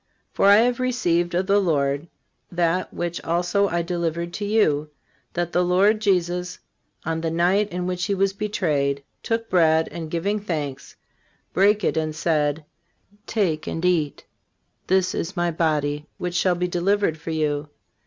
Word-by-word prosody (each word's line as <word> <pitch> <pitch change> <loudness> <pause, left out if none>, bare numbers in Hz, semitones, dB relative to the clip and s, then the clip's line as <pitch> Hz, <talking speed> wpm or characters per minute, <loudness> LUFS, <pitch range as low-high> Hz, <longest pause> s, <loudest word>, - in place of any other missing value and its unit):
For, - - +3
I 200 - +8
have 240 +3 +3
received 175 -9 0
of 185 +2 +1
the 200 +1 +3
Lord 145 -4 0 0.4
that 175 +1 0
which 175 0 -4
also 175 +4 +1
I 170 -2 -1
delivered 170 -1 -2
to 205 - -3
you, 155 -9 +2 0.4
that 175 0 -2
the 180 - +3
Lord 195 +5 +3
Jesus, 180 -2 0 0.5
on 160 0 -1
the 165 - -1
night 180 +5 +2
in 180 +1 -3
which 180 0 -2
he 200 0 0
was 195 0 +1
betrayed, 150 -9 -1 0.2
took 225 0 -2
bread, 160 -4 +3
and 160 0 -6
giving 195 +6 -1
thanks, 150 -9 -5 0.6
brake 205 +2 +3
it, - - +1
and 155 -1 -1
said: 155 -1 0 0.6
Take 180 -9 0
and 165 +2 -3
eat: 165 -5 0 0.6
this 185 -1 +2
is 180 +3 -4
My 175 0 +1
body 150 -2 -1
which 180 -1 -3
shall 180 +1 +2
be 180 +1 -1
delivered 180 -1 +1
for 165 - -7
you. 150 -2 -1
175 Hz, 160 wpm, -23 LUFS, 160-195 Hz, 0.6 s, I